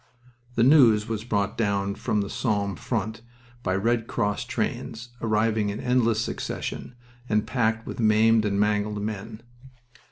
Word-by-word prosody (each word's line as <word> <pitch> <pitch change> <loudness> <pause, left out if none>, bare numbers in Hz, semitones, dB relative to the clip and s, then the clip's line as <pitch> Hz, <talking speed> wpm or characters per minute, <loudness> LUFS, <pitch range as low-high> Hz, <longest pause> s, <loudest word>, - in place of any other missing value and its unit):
The 115 - +3
news 120 -6 +6
was 110 -1 -3
brought 100 -3 -1
down 100 -2 0
from 105 +1 -1
the 100 - -4
Somme 100 -5 -1
front 115 -2 -3 0.4
by 95 -5 0
Red 115 +3 0
Cross 105 -3 -1
trains, 120 +2 -3
arriving 110 -1 +1
in 100 - -4
endless 120 -3 +2
succession, 120 - -4 0.3
and 105 -1 +2
packed 110 -1 0
with - - -7
maimed 110 0 +4
and 100 -1 0
mangled 105 0 +1
men. 110 +2 -5
110 Hz, 140 wpm, -25 LUFS, 105-115 Hz, 0.4 s, news